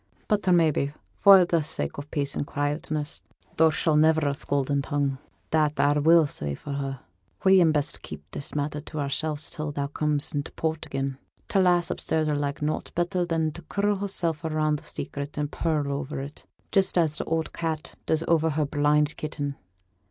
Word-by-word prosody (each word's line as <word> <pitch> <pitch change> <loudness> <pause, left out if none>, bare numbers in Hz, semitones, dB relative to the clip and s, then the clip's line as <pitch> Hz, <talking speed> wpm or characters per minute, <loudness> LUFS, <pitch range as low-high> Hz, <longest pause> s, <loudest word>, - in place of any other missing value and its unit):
But 205 -3 0
may 165 -3 +5
be, 140 0 -1 0.3
for 195 -3 +8
t' 170 -2 +1
sake 150 -1 -4
o' - - -4
peace 140 -2 -1
an' - - -1
quietness 145 +1 -3 0.4
tho' 160 0 +6
she's 155 0 +1
niver 155 0 +4
a - - 0
scolding 140 0 -1
tongue, 140 -2 -1 0.3
that 155 -2 +3
a 145 +1 +3
will 165 +1 +6
say 75 - -4
for 145 - -7
her 135 -2 -4 0.4
we'n 190 -4 +6
best 150 -2 0
keep 75 -1 -9
this 140 - -6
matter 150 0 -2
to 155 0 -7
ourselves 145 +2 0
till 155 -3 -3
thou 140 -1 -2
comes 150 0 0
int' 145 -1 -4
port 160 0 -2
again. 135 -1 -3 0.3
T' 195 - +1
lass 175 -2 +3
upstairs 160 -1 0
'll 150 - +1
like 145 0 -2
nought 155 +1 -2
better 175 +1 0
than 165 -2 0
t' 170 - -10
curl 205 0 +1
hersel' 190 -4 +2
round 155 -1 0
a - - -19
secret, 140 -1 -6
and 145 0 -2
purr 155 -4 -1
o'er 140 0 -3
it, 140 +2 -9 0.2
just 195 -2 +2
as 155 -3 +2
t' - - -2
oud 165 -1 -1
cat 160 -2 -3
does 160 0 +1
o'er 160 -1 +3
her 155 0 0
blind 150 +1 +2
kitten. 145 -2 -4
150 Hz, 190 wpm, -26 LUFS, 145-160 Hz, 0.4 s, for